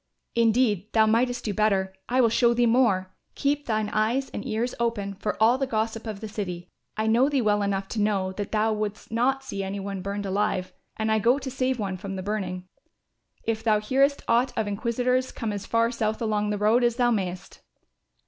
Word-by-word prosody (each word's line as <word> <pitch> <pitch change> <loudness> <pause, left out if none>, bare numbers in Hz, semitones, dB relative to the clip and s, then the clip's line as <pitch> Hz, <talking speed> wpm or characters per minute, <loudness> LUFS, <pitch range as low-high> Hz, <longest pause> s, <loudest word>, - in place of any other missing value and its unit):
"Indeed 225 -3 +2
thou 220 -1 +5
mightest 240 +2 +1
do 210 - -1
better. 195 -2 +1 0.2
I 255 +1 +3
will 230 - +4
show 235 +1 +3
thee 240 0 +3
more. 220 -6 +2 0.2
Keep 290 +1 0
thine 215 -2 0
eyes 230 +6 0
and - - -5
ears 235 0 -2
open 220 -4 -1
for 210 +2 -3
all 235 +4 +4
the 270 - 0
gossip 225 -1 -2
of 215 -2 -5
the 220 - -5
city. 180 -4 -5 0.3
I 215 - 0
know 235 +5 +4
thee 285 -2 +1
well 210 -1 +2
enough 195 -1 -1
to 220 - -2
know 195 -3 +1
that 200 +1 -5
thou 220 0 +2
wouldst 215 0 -4
not 265 +4 +1
see 200 -6 -4
any 195 +1 -4
one 195 -1 -4
burned 200 +1 -4
alive 190 -1 -1 0.2
and 220 0 0
I 220 - +3
go 240 +5 +3
to 265 -2 -5
save 260 0 0
one 195 -4 -3
from 195 +1 -6
the 185 - -5
burning. 185 -3 -3 0.8
If 225 -1 -2
thou 215 -2 +3
hearest 270 +6 +2
aught 240 +3 +3
of 220 -2 0
inquisitors 245 +5 0
come 225 -3 -3
as 205 -1 -6
far 230 0 +2
south 220 -2 -1
along 210 -2 0
the 210 - -1
road 215 +4 +3
as 240 -1 +2
thou 240 -1 +2
mayest." 190 -3 -3
220 Hz, 210 wpm, -26 LUFS, 200-240 Hz, 0.8 s, thou